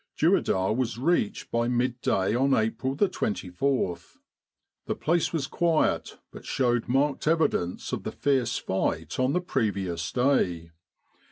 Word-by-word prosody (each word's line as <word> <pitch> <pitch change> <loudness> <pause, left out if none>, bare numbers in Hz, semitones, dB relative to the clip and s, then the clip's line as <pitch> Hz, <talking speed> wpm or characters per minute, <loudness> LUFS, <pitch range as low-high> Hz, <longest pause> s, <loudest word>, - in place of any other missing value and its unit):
Dueidar 95 +2 +2
was 120 -3 -1
reached 135 -5 0
by 115 0 +1
midday 120 -5 0
on 135 +3 +3
April 115 +5 -1
24. 105 - 0 0.9
The - - -1
place 170 +1 +1
was 160 -5 -1
quiet, 165 +1 0
but - - -11
showed 120 -3 0
marked 140 +3 +1
evidence 155 - 0
of - - -2
the - - -5
fierce 130 -4 0
fight 85 -2 -2
on 130 +2 +2
the 180 - +1
previous 100 - -2
day. 90 -11 +1
125 Hz, 125 wpm, -27 LUFS, 100-140 Hz, 0.9 s, on